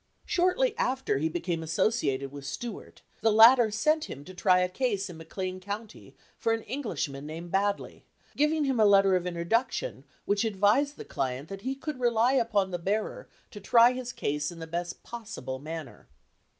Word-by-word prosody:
Shortly 410 Hz, +7 st, +2 dB
after 265 Hz, -, 0 dB
he 160 Hz, +2 st, 0 dB
became 170 Hz, 0 st, -2 dB
associated 155 Hz, -, 0 dB
with 140 Hz, -1 st, -9 dB
Stuart, 205 Hz, -, -7 dB, 0.2 s
the 225 Hz, -, +4 dB
latter 225 Hz, +2 st, +7 dB
sent 305 Hz, +9 st, +1 dB
him 140 Hz, +1 st, -9 dB
to 185 Hz, -, -10 dB
try 180 Hz, 0 st, +3 dB
a 180 Hz, -, +2 dB
case 200 Hz, -2 st, -2 dB
in 165 Hz, -, -10 dB
McLean 185 Hz, +3 st, -5 dB
County 205 Hz, +3 st, -8 dB, 0.2 s
for 225 Hz, -, +1 dB
an 225 Hz, -1 st, -2 dB
Englishman 180 Hz, -, -4 dB
named 165 Hz, +2 st, -7 dB
Baddeley, 200 Hz, +1 st, -1 dB, 0.3 s
giving 300 Hz, +1 st, +2 dB
him 265 Hz, -4 st, 0 dB
a 215 Hz, -, +6 dB
letter 195 Hz, -2 st, +5 dB
of 180 Hz, -1 st, -1 dB
introduction 230 Hz, -, -1 dB, 0.2 s
which 205 Hz, +1 st, +1 dB
advised 220 Hz, +7 st, +2 dB
the -, -, -8 dB
client 135 Hz, +3 st, -3 dB
that 195 Hz, 0 st, -7 dB
he 265 Hz, +4 st, -2 dB
could 280 Hz, 0 st, -6 dB
rely 240 Hz, +1 st, +3 dB
upon 215 Hz, -7 st, +1 dB
the 175 Hz, -, -3 dB
bearer 205 Hz, +5 st, -2 dB, 0.2 s
to 205 Hz, -, -9 dB
try 235 Hz, +4 st, +6 dB
his 250 Hz, -1 st, -5 dB
case 145 Hz, -7 st, -2 dB
in 170 Hz, -, -11 dB
the 165 Hz, -, -6 dB
best 175 Hz, +1 st, -5 dB
pos 230 Hz, -2 st, -8 dB
sible 130 Hz, +1 st, -6 dB
manner. 155 Hz, -3 st, -8 dB
200 Hz, 180 wpm, -28 LUFS, 170-240 Hz, 0.3 s, latter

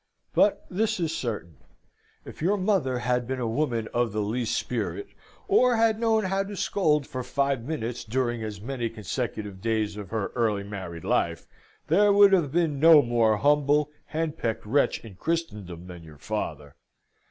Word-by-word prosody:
But 205 Hz, -, +3 dB
this 210 Hz, +2 st, -1 dB
is 165 Hz, -2 st, -1 dB
certain: 105 Hz, -, -4 dB, 0.7 s
if -, -, -11 dB
your 195 Hz, +6 st, +2 dB
mother 185 Hz, -10 st, +1 dB
had 125 Hz, 0 st, 0 dB
been 130 Hz, 0 st, -3 dB
a 120 Hz, -, -1 dB
woman 115 Hz, -2 st, -1 dB
of 120 Hz, -2 st, +1 dB
the 105 Hz, 0 st, 0 dB
least 115 Hz, +3 st, -1 dB
spirit, 125 Hz, -, -3 dB, 0.4 s
or 250 Hz, -, +4 dB
had 225 Hz, -1 st, +2 dB
known 225 Hz, -1 st, +2 dB
how 195 Hz, +1 st, 0 dB
to 200 Hz, +1 st, -7 dB
scold 150 Hz, -7 st, +1 dB
for 130 Hz, -, -5 dB
five 135 Hz, +1 st, 0 dB
minutes 125 Hz, -4 st, -4 dB
during 120 Hz, 0 st, -1 dB
as 105 Hz, -2 st, -5 dB
many 120 Hz, +1 st, -3 dB
consecutive 105 Hz, -3 st, -5 dB
days 110 Hz, -2 st, -1 dB
of 100 Hz, -3 st, -7 dB
her 110 Hz, -3 st, -2 dB
early 110 Hz, -4 st, 0 dB
married 95 Hz, -5 st, -7 dB
life, -, -, 0 dB, 0.4 s
there 205 Hz, +1 st, +4 dB
would 200 Hz, 0 st, +7 dB
have 165 Hz, -8 st, +3 dB
been 160 Hz, -3 st, +1 dB
no 160 Hz, -1 st, +8 dB
more 115 Hz, -3 st, +2 dB
humble, 145 Hz, +4 st, +2 dB
henpecked 155 Hz, -9 st, -3 dB
wretch 135 Hz, +2 st, +1 dB
in 110 Hz, -, -10 dB
Christendom 105 Hz, -, -3 dB
than 90 Hz, -2 st, -10 dB
your 80 Hz, -2 st, -14 dB
father. 70 Hz, +1 st, -5 dB
125 Hz, 165 wpm, -26 LUFS, 110-165 Hz, 0.7 s, no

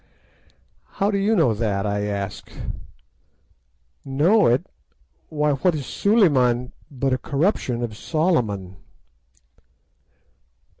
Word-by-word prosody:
"'How 200 Hz, +2 st, 0 dB
do 200 Hz, -, 0 dB
you 210 Hz, +3 st, +2 dB
know 160 Hz, -, +3 dB
that?' 105 Hz, -2 st, -1 dB
I 105 Hz, 0 st, -1 dB
asked. 100 Hz, -1 st, -5 dB, 1.5 s
"'Know 165 Hz, +11 st, +3 dB
it! 125 Hz, +9 st, +2 dB, 0.6 s
why, 150 Hz, -1 st, +1 dB
what 155 Hz, +5 st, +1 dB
is 145 Hz, -3 st, -4 dB
"Suliman" 130 Hz, -, +2 dB, 0.2 s
but 135 Hz, -2 st, -1 dB
a 130 Hz, -, 0 dB
corruption 140 Hz, -, -1 dB
of 110 Hz, -3 st, -4 dB
Solomon? 110 Hz, -, -1 dB
135 Hz, 100 wpm, -22 LUFS, 110-170 Hz, 1.5 s, know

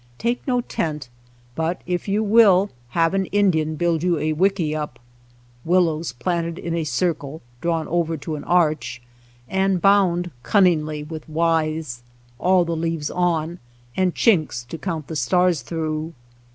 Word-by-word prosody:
Take 235 Hz, +1 st, -1 dB
no 250 Hz, -2 st, +2 dB
tent, 150 Hz, -, -3 dB, 0.4 s
but 160 Hz, +5 st, -2 dB
if 180 Hz, +1 st, -2 dB
you 205 Hz, +2 st, +1 dB
will, 205 Hz, -3 st, +5 dB, 0.3 s
have 165 Hz, +1 st, +3 dB
an 195 Hz, -1 st, 0 dB
Indian 160 Hz, -6 st, +1 dB
build 170 Hz, -1 st, 0 dB
you 175 Hz, -1 st, +1 dB
a 155 Hz, +1 st, 0 dB
wickiup, 155 Hz, -6 st, 0 dB, 0.7 s
willows 165 Hz, -3 st, +1 dB
planted 170 Hz, +6 st, -2 dB
in 170 Hz, -, -4 dB
a 165 Hz, -2 st, -1 dB
circle, 155 Hz, +1 st, -2 dB, 0.2 s
drawn 165 Hz, -2 st, -1 dB
over 165 Hz, -1 st, 0 dB
to 155 Hz, +2 st, -5 dB
an 145 Hz, -, -7 dB
arch, 155 Hz, -8 st, +1 dB, 0.5 s
and 190 Hz, -1 st, +1 dB
bound 180 Hz, -2 st, +3 dB
cunningly 155 Hz, -, +2 dB
with 155 Hz, 0 st, -8 dB
withes, 155 Hz, -5 st, 0 dB, 0.4 s
all 180 Hz, -1 st, +3 dB
the 170 Hz, 0 st, -2 dB
leaves 165 Hz, -2 st, -2 dB
on, 170 Hz, -1 st, 0 dB, 0.4 s
and 185 Hz, -2 st, +1 dB
chinks 155 Hz, -, +2 dB
to 165 Hz, -, -6 dB
count 165 Hz, -5 st, -3 dB
the 160 Hz, -, -7 dB
stars 175 Hz, +4 st, +2 dB
through. 155 Hz, +3 st, -3 dB
165 Hz, 145 wpm, -22 LUFS, 155-180 Hz, 0.7 s, will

